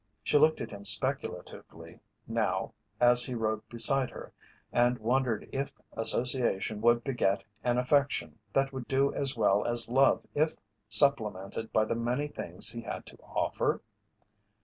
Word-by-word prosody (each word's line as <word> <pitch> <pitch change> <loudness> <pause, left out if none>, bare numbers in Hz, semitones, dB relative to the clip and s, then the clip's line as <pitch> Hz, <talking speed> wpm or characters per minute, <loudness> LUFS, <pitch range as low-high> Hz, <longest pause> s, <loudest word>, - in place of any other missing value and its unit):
She 145 - +2
looked 155 +1 +3
at - - -6
him 100 -1 -10
speculatively 100 +1 0 0.3
now - - -2 0.3
as 120 0 +5
he 125 - -4
rode 110 -1 -3
beside 130 +2 +3
her - - -11 0.4
and 120 +1 +2
wondered 120 -1 -1
if 135 +1 -4 0.2
association 115 -2 +1
would 120 0 +2
beget 115 -7 -1 0.2
an 120 -1 0
affection 140 +3 0
that 135 0 0
would 130 -2 -7
do 135 +1 +1
as 135 -3 -1
well 105 -2 +2
as 120 -1 0
love 135 +3 +2
if 155 +2 0 0.3
supplemented 110 -4 +4
by 110 - +2
the - - -2
many 120 +5 -2
things 90 - -1
he 115 0 -7
had 115 - -7
to - - -12
offer? - - -3
120 Hz, 150 wpm, -29 LUFS, 110-135 Hz, 0.4 s, as